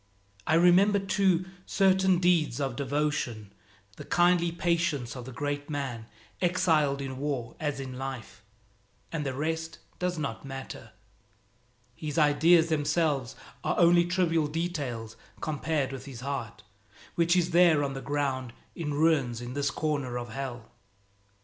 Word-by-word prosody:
I 155 Hz, -, +4 dB
remember, 180 Hz, +4 st, +5 dB
too, 190 Hz, -2 st, +1 dB, 0.2 s
certain 190 Hz, -1 st, +3 dB
deeds 170 Hz, -8 st, +2 dB
of 135 Hz, -3 st, -2 dB
devotion, 135 Hz, -7 st, -2 dB, 0.4 s
the -, -, -7 dB
kindly 175 Hz, -1 st, +3 dB
patience 170 Hz, -7 st, -1 dB
of 125 Hz, -2 st, -7 dB
the 130 Hz, -, -8 dB
great 145 Hz, +3 st, -3 dB
man, 130 Hz, -6 st, -4 dB, 0.3 s
exiled 160 Hz, -6 st, +2 dB
in 130 Hz, -1 st, -6 dB
war 135 Hz, -5 st, -3 dB
as 145 Hz, -3 st, -2 dB
in 130 Hz, -1 st, -6 dB
life 130 Hz, -4 st, -6 dB, 0.7 s
and 160 Hz, -2 st, -2 dB
the 135 Hz, -2 st, -3 dB
rest 160 Hz, +2 st, -3 dB, 0.2 s
does 180 Hz, -1 st, -1 dB
not 140 Hz, -7 st, -4 dB
matter. 135 Hz, -1 st, -8 dB, 1.0 s
His 150 Hz, -1 st, -5 dB
ideas 160 Hz, +2 st, +5 dB
themselves 150 Hz, -4 st, 0 dB, 0.3 s
are -, -, 0 dB
only 175 Hz, 0 st, +5 dB
trivial 170 Hz, -3 st, +1 dB
details 145 Hz, -9 st, -4 dB, 0.2 s
compared 155 Hz, -2 st, -1 dB
with 135 Hz, -1 st, -7 dB
his 130 Hz, -4 st, -9 dB
heart 125 Hz, -6 st, -5 dB, 0.5 s
which 170 Hz, +1 st, +2 dB
is 175 Hz, -1 st, +2 dB
there 170 Hz, -4 st, +5 dB
on 140 Hz, -1 st, -2 dB
the 135 Hz, -, -6 dB
ground 135 Hz, -4 st, -2 dB, 0.2 s
in 150 Hz, -4 st, -3 dB
ruins 145 Hz, -7 st, +2 dB
in 120 Hz, +1 st, -6 dB
this 140 Hz, 0 st, 0 dB
corner 140 Hz, -4 st, -2 dB
of 120 Hz, -1 st, -5 dB
Hell. 125 Hz, -2 st, -6 dB
145 Hz, 140 wpm, -28 LUFS, 130-170 Hz, 1.0 s, remember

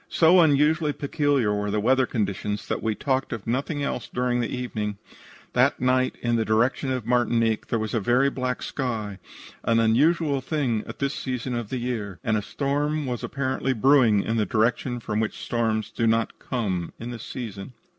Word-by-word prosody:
"So 170 Hz, +2 st, +5 dB
unusually 150 Hz, 0 st, +3 dB
peculiar 140 Hz, -7 st, +1 dB
were 105 Hz, 0 st, -1 dB
the 105 Hz, +1 st, 0 dB
weather 130 Hz, +4 st, +3 dB
conditions 105 Hz, -1 st, -2 dB
that -, -, -2 dB
we 110 Hz, -1 st, 0 dB
talked 135 Hz, +2 st, -1 dB
of 110 Hz, -3 st, -5 dB
nothing 140 Hz, +5 st, -1 dB
else -, -, -3 dB
during 125 Hz, 0 st, 0 dB
the 120 Hz, -, -1 dB
evening. 110 Hz, -5 st, -3 dB, 0.6 s
That -, -, +3 dB
night, 130 Hz, 0 st, +2 dB
in 120 Hz, -1 st, +2 dB
the 115 Hz, -, +1 dB
direction 120 Hz, +5 st, +1 dB
of 130 Hz, -1 st, -2 dB
Martinique, 115 Hz, -2 st, +1 dB
there 115 Hz, -, 0 dB
was 110 Hz, -1 st, -3 dB
a 115 Hz, -, +2 dB
very 125 Hz, +6 st, +3 dB
black 130 Hz, -1 st, -3 dB
sky, 110 Hz, -7 st, -3 dB, 0.4 s
an 115 Hz, 0 st, +3 dB
unusual 140 Hz, +5 st, +3 dB
thing 130 Hz, -8 st, -1 dB
at -, -, -8 dB
this 140 Hz, +1 st, -1 dB
season 125 Hz, -1 st, -3 dB
of 120 Hz, -3 st, -3 dB
the 130 Hz, -, -2 dB
year, 115 Hz, -6 st, -3 dB
and 110 Hz, -3 st, +1 dB
a 105 Hz, -, +1 dB
storm 145 Hz, +5 st, -1 dB
was 125 Hz, -2 st, -3 dB
apparently 135 Hz, 0 st, -1 dB
brewing 120 Hz, -4 st, +4 dB
in 115 Hz, 0 st, 0 dB
a 105 Hz, -, +2 dB
direction 120 Hz, +4 st, +1 dB
from 110 Hz, -2 st, -2 dB
which 110 Hz, -1 st, -2 dB
storms 110 Hz, -2 st, -1 dB
do 115 Hz, -, 0 dB
not 115 Hz, 0 st, +1 dB
come 95 Hz, -9 st, -2 dB
at 120 Hz, +2 st, -5 dB
this 115 Hz, -2 st, -7 dB
season. 110 Hz, -2 st, -7 dB
120 Hz, 185 wpm, -25 LUFS, 110-135 Hz, 0.6 s, So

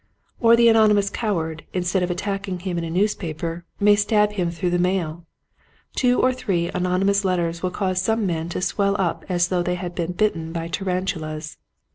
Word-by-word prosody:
Or 230 Hz, -1 st, +6 dB
the 235 Hz, 0 st, +5 dB
anonymous 210 Hz, -3 st, +4 dB
coward 165 Hz, -8 st, -2 dB
instead 180 Hz, +1 st, 0 dB
of 180 Hz, -, 0 dB
attacking 195 Hz, 0 st, -3 dB
him 180 Hz, -1 st, -3 dB
in -, -, -3 dB
a 165 Hz, -, -4 dB
newspaper 170 Hz, -3 st, -2 dB
may 205 Hz, 0 st, +6 dB
stab 210 Hz, 0 st, +2 dB
him 180 Hz, -5 st, -1 dB
through 170 Hz, +1 st, -2 dB
the 175 Hz, -, +1 dB
mail. 175 Hz, -2 st, -1 dB, 0.7 s
Two 250 Hz, -1 st, +3 dB
or 255 Hz, -, +3 dB
three 180 Hz, -9 st, -1 dB
an 180 Hz, 0 st, -1 dB
onymous 195 Hz, +3 st, +2 dB
letters 170 Hz, -3 st, 0 dB
will 185 Hz, -, 0 dB
cause 185 Hz, 0 st, -1 dB
some 220 Hz, +2 st, +1 dB
men 165 Hz, -2 st, -2 dB
to 180 Hz, -, -3 dB
swell 200 Hz, +1 st, +1 dB
up 185 Hz, -4 st, -1 dB
as 175 Hz, -1 st, +1 dB
though 180 Hz, -1 st, +1 dB
they 180 Hz, +1 st, -1 dB
had 180 Hz, 0 st, -5 dB
been 175 Hz, 0 st, -3 dB
bitten 170 Hz, -5 st, 0 dB
by 165 Hz, -1 st, -4 dB
tarantulas. 170 Hz, -5 st, -3 dB
180 Hz, 190 wpm, -23 LUFS, 170-200 Hz, 0.7 s, Or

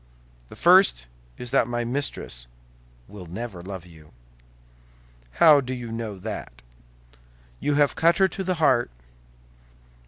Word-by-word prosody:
"The -, -, -12 dB
first -, -, +4 dB, 0.3 s
is 125 Hz, -, -8 dB
that 115 Hz, -, +3 dB
my 120 Hz, 0 st, -2 dB
mistress 120 Hz, -, -3 dB, 0.6 s
will 95 Hz, -4 st, -11 dB
never 95 Hz, +1 st, -7 dB
love 95 Hz, -1 st, -8 dB
you." 80 Hz, -3 st, -17 dB, 1.2 s
"How 150 Hz, -, +6 dB
do 130 Hz, 0 st, -5 dB
you 120 Hz, -2 st, -7 dB
know 115 Hz, -3 st, -5 dB
that?" 90 Hz, -, -8 dB, 1.0 s
"You 145 Hz, -, 0 dB
have 145 Hz, -1 st, +3 dB
cut 170 Hz, +1 st, +3 dB
her 190 Hz, -, +4 dB
to 190 Hz, +2 st, -6 dB
the 185 Hz, 0 st, -1 dB
heart." 135 Hz, -7 st, +2 dB
120 Hz, 130 wpm, -24 LUFS, 90-145 Hz, 1.2 s, How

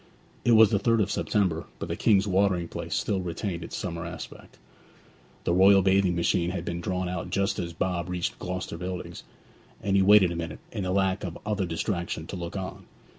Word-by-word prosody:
It 120 Hz, -, +4 dB
was 110 Hz, -2 st, +7 dB
the 100 Hz, -, +2 dB
3rd 115 Hz, +1 st, +3 dB
of -, -, -3 dB
September, 95 Hz, -6 st, 0 dB
but -, -, -5 dB
the -, -, -2 dB
King's 100 Hz, -2 st, +3 dB
watering 95 Hz, -3 st, +2 dB
place -, -, -5 dB
still 100 Hz, -3 st, 0 dB
retained 90 Hz, 0 st, -4 dB
its -, -, -6 dB
summer 85 Hz, -3 st, -4 dB
aspect. 85 Hz, 0 st, -9 dB, 0.9 s
The 85 Hz, -, +1 dB
royal 95 Hz, +1 st, +6 dB
bathing 95 Hz, -1 st, +3 dB
machine 85 Hz, 0 st, +1 dB
had 90 Hz, -1 st, -4 dB
been 85 Hz, 0 st, -3 dB
drawn 90 Hz, +1 st, -2 dB
out 90 Hz, 0 st, -4 dB
just 100 Hz, +1 st, 0 dB
as 85 Hz, -1 st, -3 dB
Bob 85 Hz, +1 st, -2 dB
reached 90 Hz, -1 st, -3 dB
Gloucester 90 Hz, -2 st, -4 dB
Buildings, 90 Hz, 0 st, -5 dB, 0.6 s
and 100 Hz, -1 st, 0 dB
he 100 Hz, -, +5 dB
waited 95 Hz, -2 st, +6 dB
a -, -, -3 dB
minute, 80 Hz, -2 st, -4 dB
in 100 Hz, -4 st, -3 dB
the 90 Hz, -, -1 dB
lack 95 Hz, 0 st, +1 dB
of 85 Hz, -4 st, -5 dB
other 105 Hz, -3 st, -1 dB
distraction, 85 Hz, -1 st, -3 dB
to 95 Hz, -, -7 dB
look 85 Hz, +2 st, -5 dB
on. 95 Hz, -1 st, -6 dB
90 Hz, 200 wpm, -27 LUFS, 85-100 Hz, 0.9 s, was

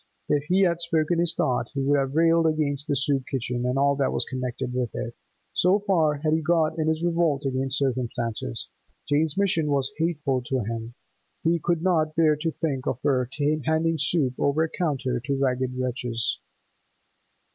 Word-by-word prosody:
If 145 Hz, -1 st, +1 dB
he 185 Hz, +5 st, +2 dB
had 170 Hz, -3 st, +2 dB
spoken 165 Hz, 0 st, +1 dB
his 170 Hz, -1 st, +1 dB
thought, 125 Hz, -2 st, 0 dB
he 135 Hz, -, 0 dB
would 140 Hz, +1 st, +3 dB
have 135 Hz, +1 st, -2 dB
railed 165 Hz, 0 st, +4 dB
against 150 Hz, -2 st, -1 dB
the 145 Hz, -, +1 dB
soup 135 Hz, -1 st, 0 dB
kitchen 125 Hz, -1 st, -2 dB
and 125 Hz, +2 st, 0 dB
all 140 Hz, +1 st, +3 dB
that 135 Hz, -2 st, +1 dB
was -, -, 0 dB
connected 130 Hz, -1 st, -4 dB
with 125 Hz, -2 st, -1 dB
it. 115 Hz, -, -4 dB, 0.4 s
So 185 Hz, +3 st, +4 dB
far 175 Hz, -8 st, +2 dB
had 155 Hz, +1 st, 0 dB
he 160 Hz, -, +2 dB
got 160 Hz, 0 st, +1 dB
in 155 Hz, -, 0 dB
his 160 Hz, +1 st, 0 dB
revolt 165 Hz, -5 st, +1 dB
against 135 Hz, +1 st, 0 dB
circumstances; 120 Hz, -, -2 dB, 0.4 s
Jane's 150 Hz, +2 st, +1 dB
'mission' 180 Hz, -6 st, +2 dB
was 140 Hz, -2 st, +1 dB
hateful 150 Hz, -5 st, 0 dB
to 130 Hz, -2 st, 0 dB
him; 115 Hz, +2 st, -5 dB, 0.5 s
he 165 Hz, +1 st, +2 dB
could 170 Hz, +1 st, 0 dB
not 160 Hz, -4 st, +1 dB
bear 155 Hz, -2 st, +4 dB
to 165 Hz, +2 st, -1 dB
think 145 Hz, -5 st, -3 dB
of -, -, -1 dB
her 125 Hz, -3 st, +1 dB, 0.3 s
handing 160 Hz, +1 st, +1 dB
soup 145 Hz, -3 st, +1 dB
over 145 Hz, +3 st, +2 dB
a 160 Hz, -, -1 dB
counter 135 Hz, -7 st, -1 dB
to 135 Hz, +3 st, -2 dB
ragged 130 Hz, -1 st, 0 dB
wretches. 125 Hz, -2 st, -2 dB
145 Hz, 180 wpm, -25 LUFS, 130-160 Hz, 0.5 s, railed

